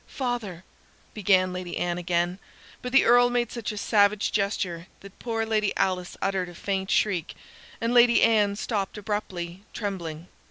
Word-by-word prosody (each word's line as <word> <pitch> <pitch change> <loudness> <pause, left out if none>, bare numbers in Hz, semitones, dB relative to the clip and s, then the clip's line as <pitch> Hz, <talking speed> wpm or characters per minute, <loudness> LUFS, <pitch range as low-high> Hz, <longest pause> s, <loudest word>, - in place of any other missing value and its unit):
"Father," 240 - -4 0.5
began 185 -3 +2
Lady 180 -1 -5
Anne 175 0 -1
again; 175 +1 -1 0.4
but 250 - -5
the 270 - +5
Earl 245 +1 +6
made 240 -1 0
such 235 -3 -4
a 210 - -7
savage 205 0 +2
gesture 190 -4 -2
that 200 0 -14
poor 225 -2 -2
Lady 215 -2 0
Alice 180 -2 -1
uttered 190 -2 -1
a 175 - -12
faint 190 +1 -3
shriek, 185 -6 0 0.4
and 230 +1 -1
Lady 240 -1 +6
Anne 210 -3 +3
stopped 205 -1 -3
abruptly, 195 -4 -4
trembling. 175 -6 -5
200 Hz, 155 wpm, -26 LUFS, 180-225 Hz, 0.5 s, Earl